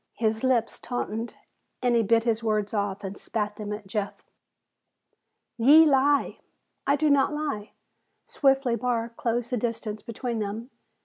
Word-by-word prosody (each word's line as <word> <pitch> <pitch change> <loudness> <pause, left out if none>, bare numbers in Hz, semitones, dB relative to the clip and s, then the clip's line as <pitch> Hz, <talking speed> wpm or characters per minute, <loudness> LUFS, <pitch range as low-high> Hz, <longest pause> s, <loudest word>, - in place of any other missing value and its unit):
His 220 0 -1
lips 245 -3 +1
tautened, 230 -2 -4 0.4
and 245 -1 +2
he 230 - +4
bit 225 +1 +3
his 230 -1 0
words 215 -2 -1
off 205 -1 -2
and 195 0 -6
spat 210 -2 -3
them 210 -1 -5
at 210 0 -5
Jeff. 205 +1 -4 1.4
"Ye 295 +7 +8
lie!" 285 0 +2 0.5
"I 280 - +4
do 310 +1 +1
not 285 +1 +3
lie!" 285 -9 -4 0.5
Swiftly 270 -3 +2
Barr 235 -1 -1
closed 235 +1 -2
the 250 - +1
distance 220 -2 -3
between 235 0 -4
them. 215 +5 -4
230 Hz, 145 wpm, -26 LUFS, 215-255 Hz, 1.4 s, Ye